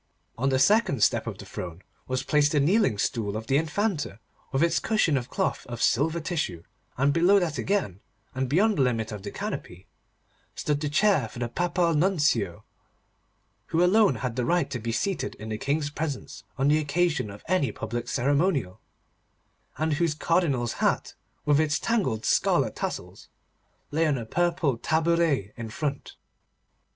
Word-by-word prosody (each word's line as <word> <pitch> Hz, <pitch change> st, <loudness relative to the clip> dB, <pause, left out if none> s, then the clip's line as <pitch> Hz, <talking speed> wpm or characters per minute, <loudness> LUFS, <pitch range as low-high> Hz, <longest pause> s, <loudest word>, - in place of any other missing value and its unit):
On 135 Hz, +3 st, 0 dB
the 130 Hz, -, +2 dB
second 140 Hz, -, +3 dB
step -, -, +2 dB
of -, -, -4 dB
the -, -, -10 dB
throne 90 Hz, 0 st, -7 dB, 0.2 s
was 130 Hz, 0 st, -1 dB
placed 145 Hz, +1 st, +2 dB
the 150 Hz, -, +3 dB
kneeling 160 Hz, -, +3 dB
stool 105 Hz, -1 st, -1 dB
of 110 Hz, -, -6 dB
the 135 Hz, +4 st, +2 dB
Infanta, 160 Hz, -, -1 dB, 0.3 s
with 135 Hz, +4 st, +2 dB
its 170 Hz, 0 st, +2 dB
cushion 215 Hz, -9 st, +2 dB
of 125 Hz, -2 st, -2 dB
cloth -, -, -1 dB
of 120 Hz, -2 st, -6 dB
silver 155 Hz, +9 st, +2 dB
tissue, 155 Hz, -, -3 dB, 0.3 s
and 140 Hz, +2 st, +3 dB
below 175 Hz, +5 st, +5 dB
that 170 Hz, -5 st, 0 dB
again, 185 Hz, -, -1 dB, 0.3 s
and 130 Hz, -1 st, -2 dB
beyond 200 Hz, +7 st, +3 dB
the -, -, +5 dB
limit 115 Hz, -3 st, 0 dB
of 105 Hz, -2 st, -6 dB
the -, -, -6 dB
canopy, 90 Hz, +1 st, -6 dB, 0.7 s
stood 150 Hz, -1 st, -1 dB
the 150 Hz, -, -1 dB
chair 170 Hz, -, +3 dB
for -, -, -12 dB
the 120 Hz, 0 st, -2 dB
Papal 175 Hz, +5 st, 0 dB
Nuncio, 150 Hz, -, +1 dB, 1.0 s
who 165 Hz, +1 st, +2 dB
alone 200 Hz, -, +4 dB
had 120 Hz, 0 st, -3 dB
the 125 Hz, -, 0 dB
right 175 Hz, +2 st, +1 dB
to 125 Hz, -, -3 dB
be 115 Hz, +1 st, -3 dB
seated 190 Hz, -, -2 dB
in 110 Hz, +1 st, -8 dB
the 110 Hz, 0 st, -3 dB
King's 145 Hz, +1 st, -1 dB
presence 145 Hz, -3 st, -5 dB
on 135 Hz, -, +2 dB
the 155 Hz, +1 st, +4 dB
occasion 155 Hz, -4 st, 0 dB
of 100 Hz, +1 st, -11 dB
any 180 Hz, -11 st, +1 dB
public 120 Hz, +3 st, -5 dB
ceremonial, 140 Hz, -, 0 dB, 1.0 s
and 155 Hz, 0 st, 0 dB
whose 160 Hz, 0 st, +1 dB
Cardinal's 150 Hz, -8 st, +1 dB
hat, -, -, +1 dB, 0.3 s
with 145 Hz, 0 st, +4 dB
its 155 Hz, -1 st, +2 dB
tangled 185 Hz, -, -1 dB
scarlet -, -, +2 dB
tassels, -, -, -5 dB, 0.6 s
lay 160 Hz, +2 st, +2 dB
on 145 Hz, -3 st, +1 dB
a 115 Hz, -, -5 dB
purple 170 Hz, -3 st, 0 dB
tabouret 160 Hz, -, +1 dB
in 115 Hz, -1 st, -6 dB
front. 140 Hz, +4 st, -4 dB
145 Hz, 170 wpm, -26 LUFS, 120-170 Hz, 1.0 s, below